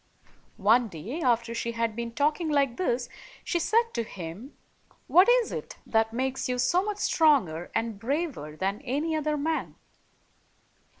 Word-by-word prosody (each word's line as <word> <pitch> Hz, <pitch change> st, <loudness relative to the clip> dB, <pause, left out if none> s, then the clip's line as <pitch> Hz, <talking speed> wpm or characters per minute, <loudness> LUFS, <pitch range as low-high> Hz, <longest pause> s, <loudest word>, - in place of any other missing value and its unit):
One 225 Hz, +4 st, +4 dB
day, 210 Hz, -, -6 dB
after 235 Hz, -3 st, +1 dB
she 235 Hz, 0 st, -3 dB
had 230 Hz, -1 st, -1 dB
been 235 Hz, 0 st, -4 dB
talking 305 Hz, +3 st, +1 dB
like 275 Hz, -5 st, +1 dB
this, 245 Hz, -9 st, 0 dB, 0.4 s
she 345 Hz, -, 0 dB
said 460 Hz, +6 st, +2 dB
to -, -, 0 dB
him, 195 Hz, -, -9 dB, 0.5 s
"What 365 Hz, +6 st, +6 dB
is -, -, +4 dB
it -, -, -6 dB
that 220 Hz, 0 st, +1 dB
makes 260 Hz, +2 st, -2 dB
you 250 Hz, -, 0 dB
so 350 Hz, +8 st, +3 dB
much 415 Hz, +1 st, -3 dB
stronger 260 Hz, -, +2 dB
and 225 Hz, -2 st, -1 dB
braver 265 Hz, -, -3 dB
than 195 Hz, +6 st, -2 dB
any 290 Hz, +4 st, -1 dB
other 305 Hz, -1 st, 0 dB
man?" 315 Hz, +2 st, -2 dB
250 Hz, 155 wpm, -27 LUFS, 225-315 Hz, 0.5 s, What